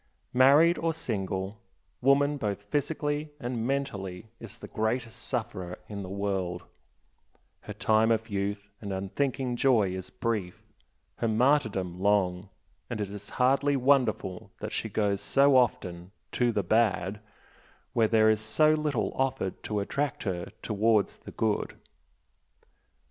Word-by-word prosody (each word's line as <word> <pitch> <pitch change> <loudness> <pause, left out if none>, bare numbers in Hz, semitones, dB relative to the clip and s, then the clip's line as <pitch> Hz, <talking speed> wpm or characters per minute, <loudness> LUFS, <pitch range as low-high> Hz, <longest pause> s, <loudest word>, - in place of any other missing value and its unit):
Married 145 +7 +6
or 165 0 0
single, 100 -7 -3 0.4
woman 140 +2 +3
both 100 -5 -3
physically 145 +5 -2
and 120 -2 -3
mentally 110 -7 -3
is 115 0 -10
the - - -9
greatest 115 +1 -2
sufferer 90 -1 -4
in 100 -1 -6
the 95 - -7
world 95 -3 -2 1.0
her 105 - -8
time 110 +1 +3
of 110 -1 +1
youth 100 0 -3
and 100 -2 -5
unthinking 125 +7 -1
joy 120 -7 +3
is 95 0 -5
brief, 110 -8 -3 0.5
her 115 - 0
martyrdom 110 -7 +1
long 95 -1 +1 0.4
and - - -4
it 100 -2 -3
is 100 0 -8
hardly 140 +3 +3
wonderful 125 -8 +1
that - - -5
she - - -2
goes 100 -2 0
so 140 0 +4
often 90 -8 +1 0.2
"to 120 -1 +2
the 105 -3 0
bad" 100 -1 +1 0.7
when 115 -3 +3
there 110 -1 +5
is 110 -1 0
so 155 +8 +3
little 150 -6 -1
offered 135 -8 -1
to 105 -1 -2
attract 140 +7 -2
her 90 -4 -3
towards 110 -1 +2
the - - -11
good. 110 -2 -1
110 Hz, 135 wpm, -28 LUFS, 100-130 Hz, 1.0 s, Married